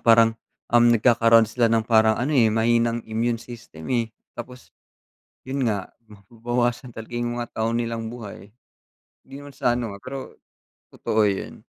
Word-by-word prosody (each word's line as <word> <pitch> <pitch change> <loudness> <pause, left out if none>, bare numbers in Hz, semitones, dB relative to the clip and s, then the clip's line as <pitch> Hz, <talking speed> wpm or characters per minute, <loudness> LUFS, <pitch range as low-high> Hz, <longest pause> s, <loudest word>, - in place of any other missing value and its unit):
parang, 115 -1 +5 0.4
um, 120 0 +6
nagkakaroon 115 -1 +5
sila 115 +1 +1
ng 115 -1 +2
parang 110 -1 +4
ano, 135 +6 -1
eh, 120 -6 +5
mahina 115 +1 +2
ang - - -4
immune 115 +2 -1
system, 115 -10 -11
eh. 115 -2 +1 0.2
Tapos 125 +1 -10 0.7
yun 135 -1 -2
nga, 100 -3 -4 0.2
mababawasan 120 +4 -3
talaga 110 +1 -9
yung 120 0 -2
mga 120 -1 -3
taon 115 +1 -1
nilang 115 -1 -3
buhay. 110 -3 -9 0.8
Hindi 135 - -14
naman 145 0 -11
sa 120 -2 0
ano, 115 -4 -3
ah, - - -17
pero 130 +3 -8 0.6
totoo 110 -1 +1
yun. 100 -1 -4
115 Hz, 160 wpm, -23 LUFS, 110-120 Hz, 0.8 s, um